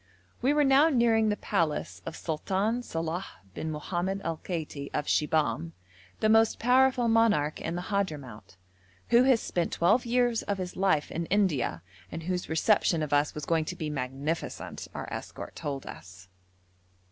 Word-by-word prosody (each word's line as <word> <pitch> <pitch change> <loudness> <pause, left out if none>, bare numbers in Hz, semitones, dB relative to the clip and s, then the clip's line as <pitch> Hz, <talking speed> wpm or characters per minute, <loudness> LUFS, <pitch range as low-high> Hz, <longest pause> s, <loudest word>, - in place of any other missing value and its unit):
We 265 - +3
were 295 0 +3
now 275 +3 +5
nearing 230 -5 +3
the 210 - 0
palace 165 -7 -1
of 165 - -5
Sultan 195 +9 -1
Salàh 165 -3 -3 0.3
bin 160 - -4
Mohammad 175 +5 -2
al 165 -1 -2
Kaiti 155 -5 -5
of 150 - -1
Shibahm, 145 - 0 0.5
the 215 - +3
most 225 0 +4
powerful 255 0 +3
monarch 225 -10 +2
in 165 - -3
the 175 - -3
Hadhramout, 150 - -4 0.5
who 240 +2 +6
has 260 -4 +4
spent 175 -2 -1
twelve 205 +9 +3
years 240 -1 +1
of 200 - -2
his 180 -1 -5
life 185 -6 +1
in 170 0 -3
India, 150 - +1 0.3
and 165 - -6
whose 180 -2 -3
reception 165 0 +2
of 150 -1 -3
us 145 +1 +2
was 150 - -5
going 165 -2 +1
to 180 - -5
be 155 -3 -4
magnificent, 140 +4 -4
our - - -5
escort - - -7
told 140 -2 -4
us. 90 0 -11
175 Hz, 160 wpm, -28 LUFS, 150-225 Hz, 0.5 s, who